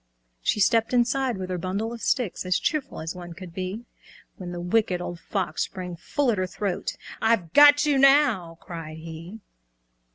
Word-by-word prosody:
She 135 - 0
stepped 225 +3 +3
inside 250 0 +1
with 185 -1 -5
her 180 - -2
bundle 200 +6 -2
of 235 - -8
sticks, 235 -2 0
As 185 0 +1
cheerful 300 - -2
as 160 +1 -4
one 175 -1 -9
could 175 0 -10
be, 190 +6 -5 0.5
When 180 -2 -7
the 175 - -5
Wicked 180 +1 +1
Old 175 -1 -6
Fox 180 -6 -3
sprang 180 -2 -7
full 270 - 0
at 210 - -1
her 185 - 0
throat. 190 -1 -3 0.2
"I've 220 -8 +1
got 290 +1 +8
you 290 -2 +3
now!" 265 - +4
cried 160 -2 -8
he. 165 +6 -9
190 Hz, 175 wpm, -25 LUFS, 175-235 Hz, 0.5 s, got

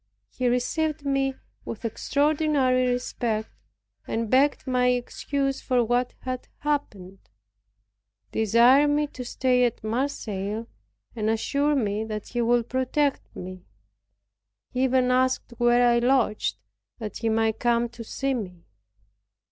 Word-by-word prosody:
He 255 - -1
received 290 +5 0
me 270 -1 +1 0.3
with 230 +1 -7
extraordinary 280 0 +1
respect, 240 -3 -2 0.6
and 225 -1 -2
begged 275 +3 +3
my 250 -1 +2
excuse 270 +2 -1
for 250 -2 +2
what 245 +2 0
had 255 -1 -5
happened; 205 -11 -3 1.1
desired 235 +6 +5
me 295 +1 +2
to 260 -3 -8
stay 250 0 +1
at 240 -3 -1
Marseilles, 220 -3 -2 0.5
and 215 -1 -1
assured 280 +6 +1
me 210 -3 0
that 215 -1 -6
he 240 - -1
would 235 0 +2
protect 260 +3 -1
me. 185 0 -8 1.1
He 255 +1 +1
even 255 -1 +2
asked 255 0 +1
where 240 0 +4
I 235 0 +4
lodged, 240 -3 +1 0.4
that 215 -4 -6
he 230 - -1
might 220 0 +1
come 240 0 +2
to 235 0 -9
see 270 +4 -2
me. 180 -8 -6
245 Hz, 125 wpm, -25 LUFS, 225-270 Hz, 1.1 s, desired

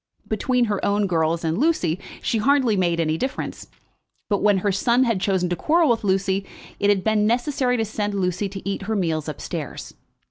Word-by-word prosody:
Between 245 +3 +1
her 205 -3 -2
own 205 0 +2
girls 165 -2 0
and 160 +3 -1
Lucy 215 - +1 0.2
she 225 - 0
hardly 260 -1 +3
made 175 -3 +1
any 160 -1 0
difference; 265 +1 -4 0.6
but 200 - +2
when 205 -1 +4
her 200 - +3
son 235 +6 +2
had 230 -7 0
chosen 190 -2 +1
to 175 - 0
quarrel 320 - +3
with 225 - 0
Lucy 190 0 +1 0.4
it 205 - +2
had 195 -2 +2
been 215 -1 +2
necessary 250 +1 +1
to 225 - 0
send 205 -1 -3
Lucy 185 +1 -1
to 195 0 -8
eat 200 - -2
her 220 - 0
meals 160 -5 -1
up 150 - -7
stairs. 160 -6 -6
200 Hz, 200 wpm, -23 LUFS, 180-230 Hz, 0.6 s, when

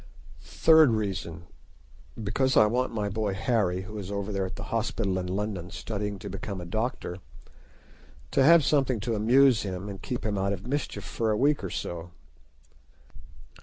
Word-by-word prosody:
Third 160 - +5
reason: 95 -6 -3 0.8
Because 130 +5 +1
I 110 - +8
want 125 +4 0
my 105 -3 -2
boy 100 -1 -2
Harry, 95 -4 0
who 105 +3 -7
is 95 -2 -6
over 100 0 -3
there 95 -2 -1
at - - -8
the - - -6
hospital 105 -4 0
in 90 - -4
London 95 -2 -3
studying 105 -1 -4
to 100 - -8
become 100 0 -5
a 90 - -7
doctor, 110 -1 -3 1.1
to 135 - +3
have 165 0 +7
something 135 -5 +2
to 115 +3 -2
amuse 120 +2 +4
him 95 0 -5
and 100 -2 -7
keep 125 - -4
him 105 -2 -1
out 100 +1 0
of 95 -1 -7
mischief 145 +2 -3
for 115 -1 -2
a 105 - +1
week 145 -1 +2
or 95 - -3
so. 85 0 -5
105 Hz, 170 wpm, -27 LUFS, 95-120 Hz, 1.1 s, I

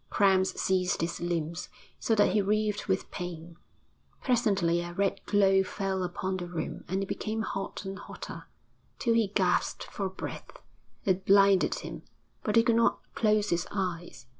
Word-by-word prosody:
Cramps 190 -2 +3
seized 185 -2 +1
his 170 +1 -2
limbs, 170 -1 -2 0.3
so 225 - +1
that 205 - +4
he 210 - +3
writhed 210 +1 0
with 190 -1 -1
pain. 170 -2 -6 0.7
Presently 200 -9 +2
a 175 0 -6
red 195 +1 0
glow 195 -2 +4
fell 190 0 -2
upon 185 +1 -2
the 175 -1 -5
room 175 -2 -5
and 190 +2 -1
it - - -2
became 220 +2 -2
hot 195 0 -4
and 195 +1 -5
hotter, - - -9 0.5
till 235 - +1
he 230 -2 +3
gasped 190 -2 +1
for 195 -2 -4
breath; 190 - -8 0.5
it 190 -1 +1
blinded 195 -1 +5
him, - - -7 0.4
but 210 - -1
he 230 - +7
could 230 -1 +3
not 230 - +3 0.2
close 210 -1 +2
his 170 0 0
eyes. 175 -9 -4
195 Hz, 165 wpm, -29 LUFS, 180-205 Hz, 0.7 s, he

